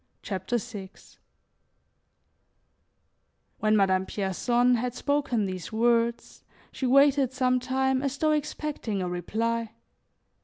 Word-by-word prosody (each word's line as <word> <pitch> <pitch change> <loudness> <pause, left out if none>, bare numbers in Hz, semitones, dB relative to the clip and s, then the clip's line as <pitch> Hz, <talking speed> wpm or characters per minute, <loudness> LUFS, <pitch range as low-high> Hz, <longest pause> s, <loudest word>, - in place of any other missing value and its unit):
CHAPTER 190 +4 -2
VI 210 -5 -7 2.7
WHEN 215 0 +3
Madame 190 -1 +2
Pierson 240 +6 +1
had 245 +1 -3
spoken 285 -7 0
these 185 0 -5
words, 235 +1 0 0.3
she 260 - -3
waited 275 0 +4
some 255 -1 +2
time 260 +1 0
as 280 0 -2
though 310 +1 +2
expecting 295 -9 -2
a - - -2
reply. 225 +6 -2
240 Hz, 105 wpm, -27 LUFS, 205-265 Hz, 2.7 s, waited